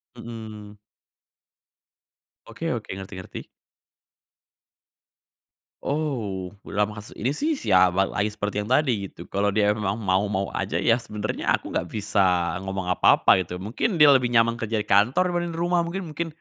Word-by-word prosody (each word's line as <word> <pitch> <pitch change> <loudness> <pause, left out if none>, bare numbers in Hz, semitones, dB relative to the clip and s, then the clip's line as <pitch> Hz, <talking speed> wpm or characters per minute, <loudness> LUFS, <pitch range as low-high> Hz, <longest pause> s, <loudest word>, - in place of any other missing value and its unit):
Mhm. 110 -3 -9 1.7
Oke - - -4
oke, - - -5
ngerti 95 +1 -9
ngerti. 95 - -9 2.4
Oh, 115 -12 -2 0.2
dalam 105 +1 0
kasus 105 0 -9
ini 120 - -2
sih 295 - 0
sama 95 - +3
lagi 105 +1 -1
seperti 105 0 -3
yang - - -9
tadi 125 -9 +2
gitu, 85 -2 -12
kalau 100 0 0
dia 105 -1 +3
memang 105 +1 -2
mau-mau 100 0 0
aja 85 +4 -1
ya 115 +4 +4
sebenernya 105 -2 -2
aku - - -2
nggak - - -2
bisa 95 -3 +1
ngomong 95 -1 -3
apa-apa 90 - +5
gitu. 90 +2 -7
Mungkin 150 - -1
dia 150 - +9
lebih 125 -3 +4
nyaman 115 0 +3
kerja 110 -2 -2
di 105 - -9
kantor 125 - +3
dibanding 175 -1 -2
dari 165 - -4
rumah 175 -1 +1
mungkin 175 -1 -5
mungkin 165 +3 -3
105 Hz, 150 wpm, -24 LUFS, 100-130 Hz, 2.4 s, dia